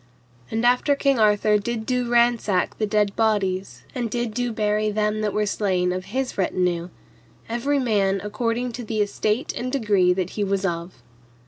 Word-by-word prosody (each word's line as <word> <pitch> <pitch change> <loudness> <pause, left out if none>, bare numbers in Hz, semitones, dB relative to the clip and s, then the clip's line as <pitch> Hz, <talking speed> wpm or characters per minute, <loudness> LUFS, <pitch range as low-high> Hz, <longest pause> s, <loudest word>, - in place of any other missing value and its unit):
And 225 +2 -1
after 250 +4 +3
King 275 -3 +1
Arthur 210 0 +3
did 220 +1 -3
do 250 -1 -1
ransack 235 -6 +2
the 215 - +1
dead 205 -1 +1
bodies, 195 -4 0
and 245 -3 -2
did 240 0 -2
do 245 +1 -1
bury 215 -1 0
them 210 0 0
that 210 -1 0
were 210 +1 0
slain 185 -3 0
of 185 0 -4
his 255 +3 -3
retinue, 180 -2 0 0.6
every 240 +5 0
man 200 -6 +1
according 230 +4 -2
to 245 +1 -6
the 215 -1 -1
estate 215 - -1
and 255 +1 -3
degree 205 -9 +2
that 185 0 -1
he 210 - -2
was 195 0 0
of. 170 -6 -4
215 Hz, 175 wpm, -23 LUFS, 195-240 Hz, 0.6 s, after